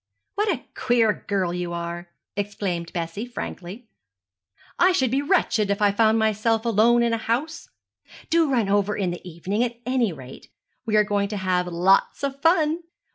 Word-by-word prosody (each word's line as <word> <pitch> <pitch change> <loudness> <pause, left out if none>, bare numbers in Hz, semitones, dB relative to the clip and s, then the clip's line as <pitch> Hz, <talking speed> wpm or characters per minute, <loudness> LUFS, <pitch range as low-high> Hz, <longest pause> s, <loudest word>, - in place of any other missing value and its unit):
'What 420 +1 0
a 280 -8 -4
queer 235 -3 +2
girl 190 -4 0
you 175 -1 -3
are!' 170 0 -5 0.3
exclaimed 195 -4 -3
Bessie, 170 +6 -4
frankly. 225 -1 -7 0.9
'I 365 +1 +5
should 260 -8 +1
be 270 +2 +1
wretched 285 - +1
if 200 - 0
I 205 -1 +4
found 220 +2 +3
myself 220 +1 +1
alone 235 +2 +4
in 235 -1 +1
a - - +1
house. 270 - -3 0.6
Do 330 -2 +3
run 235 -6 +1
over 205 +1 +1
in 185 -3 -1
the 175 - -6
evening, 185 +6 -2
at 240 -1 -3
any 250 -4 +1
rate. 130 -4 -11 0.4
We 215 - +1
are 210 - +6
going 205 -1 0
to 210 0 -4
have 185 -2 0
lots 180 +8 +2
of 275 0 -3
fun.' 325 -1 +3
215 Hz, 175 wpm, -24 LUFS, 185-245 Hz, 0.9 s, are